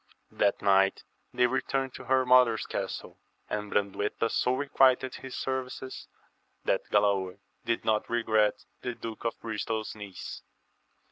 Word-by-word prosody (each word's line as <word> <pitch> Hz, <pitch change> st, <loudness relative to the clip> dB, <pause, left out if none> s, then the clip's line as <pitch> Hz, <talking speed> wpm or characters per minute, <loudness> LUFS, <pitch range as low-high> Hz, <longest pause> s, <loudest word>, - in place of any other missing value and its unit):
That 100 Hz, -, +1 dB
night 95 Hz, -1 st, +4 dB, 0.3 s
they 125 Hz, -, +3 dB
returned 130 Hz, +1 st, -1 dB
to 130 Hz, -, -9 dB
her 130 Hz, 0 st, +3 dB
mother's 125 Hz, -3 st, +5 dB
castle; -, -, -5 dB, 0.3 s
and 105 Hz, -1 st, -3 dB
Brandueta 105 Hz, +2 st, 0 dB
so 125 Hz, -, +2 dB
requited 130 Hz, -2 st, +3 dB
his 130 Hz, -1 st, -8 dB
services, 130 Hz, 0 st, -4 dB, 0.6 s
that -, -, 0 dB
Galaor 100 Hz, -2 st, +2 dB, 0.3 s
did 115 Hz, -1 st, -1 dB
not 110 Hz, -1 st, +1 dB
regret 110 Hz, -3 st, +2 dB, 0.2 s
the 125 Hz, -1 st, -3 dB
Duke 115 Hz, 0 st, -7 dB
of 115 Hz, -, -2 dB
Bristol's 110 Hz, 0 st, -3 dB
niece. 100 Hz, -4 st, -8 dB
115 Hz, 130 wpm, -29 LUFS, 105-130 Hz, 0.6 s, mother's